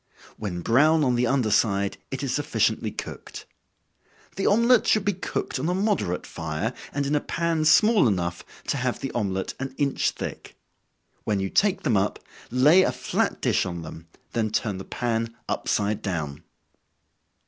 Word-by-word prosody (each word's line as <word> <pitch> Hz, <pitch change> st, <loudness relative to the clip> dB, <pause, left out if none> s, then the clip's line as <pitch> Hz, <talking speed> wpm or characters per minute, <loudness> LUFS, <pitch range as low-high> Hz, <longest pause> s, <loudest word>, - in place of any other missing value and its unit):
When 90 Hz, -5 st, -4 dB
brown 150 Hz, -, +4 dB
on 125 Hz, -3 st, +2 dB
the 120 Hz, 0 st, +2 dB
under 125 Hz, -4 st, +1 dB
side, 100 Hz, -2 st, +1 dB
it -, -, -4 dB
is -, -, -1 dB
sufficiently -, -, 0 dB
cooked. -, -, -8 dB, 0.9 s
The 195 Hz, -, 0 dB
omelet 235 Hz, +3 st, +4 dB
should 215 Hz, -3 st, +3 dB
be 205 Hz, -, +2 dB
cooked 175 Hz, -6 st, -3 dB
on 155 Hz, +6 st, -1 dB
a 180 Hz, -, +1 dB
moderate 195 Hz, -, 0 dB
fire, 80 Hz, +8 st, -3 dB, 0.2 s
and 145 Hz, 0 st, -1 dB
in 140 Hz, -, -1 dB
a 150 Hz, -, +3 dB
pan 165 Hz, -2 st, -1 dB
small 205 Hz, -, +5 dB
enough, 85 Hz, -4 st, -1 dB, 0.3 s
to -, -, +1 dB
have 125 Hz, -1 st, -1 dB
the 135 Hz, -, -4 dB
omelet 95 Hz, -4 st, -2 dB
an 130 Hz, 0 st, -5 dB
inch 140 Hz, -2 st, +1 dB
thick. -, -, -7 dB, 0.7 s
When 105 Hz, -2 st, 0 dB
you 95 Hz, 0 st, -2 dB
take 200 Hz, -1 st, +2 dB
them 120 Hz, -8 st, +2 dB
up, 95 Hz, +2 st, 0 dB, 0.3 s
lay 145 Hz, +9 st, +6 dB
a -, -, +2 dB
flat -, -, -1 dB
dish -, -, +2 dB
on 85 Hz, -2 st, -5 dB
them, 80 Hz, +1 st, -10 dB, 0.3 s
then 110 Hz, -2 st, 0 dB
turn 105 Hz, -2 st, -1 dB
the 95 Hz, -, -7 dB
pan 115 Hz, -1 st, -2 dB
upside 105 Hz, +1 st, -1 dB
down. 80 Hz, -6 st, -4 dB
120 Hz, 170 wpm, -25 LUFS, 100-155 Hz, 0.9 s, lay